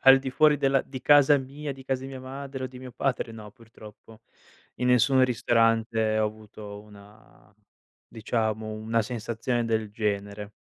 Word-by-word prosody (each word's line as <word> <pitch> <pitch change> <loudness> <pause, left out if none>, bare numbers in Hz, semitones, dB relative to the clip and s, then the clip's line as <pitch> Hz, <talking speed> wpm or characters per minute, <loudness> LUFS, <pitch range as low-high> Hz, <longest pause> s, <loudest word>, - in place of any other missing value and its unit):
al 135 0 +8
di 135 -1 -4
fuori 150 +2 +4
della 135 -1 +2
di 130 -1 -8
casa 145 0 +6
mia, 140 +2 -6
di 135 0 -12
casa 130 -1 -2
di - - -6
mia 130 -1 -8
madre 135 0 -7
o - - -1
di 125 0 -12
mio 130 -1 -10
padre 125 -3 -2
no, 105 -2 -10
purtroppo. 115 -1 -16 0.6
In 125 - -1
nessun 130 +1 +4
ristorante 115 -2 +1
ho - - +3
avuto 105 -1 -8
una 100 - -18 0.5
diciamo 110 -1 -2
una 110 +1 -1
sensazione 120 +1 -2
del 110 -2 -1
genere 100 -1 -3
115 Hz, 165 wpm, -26 LUFS, 110-130 Hz, 0.6 s, al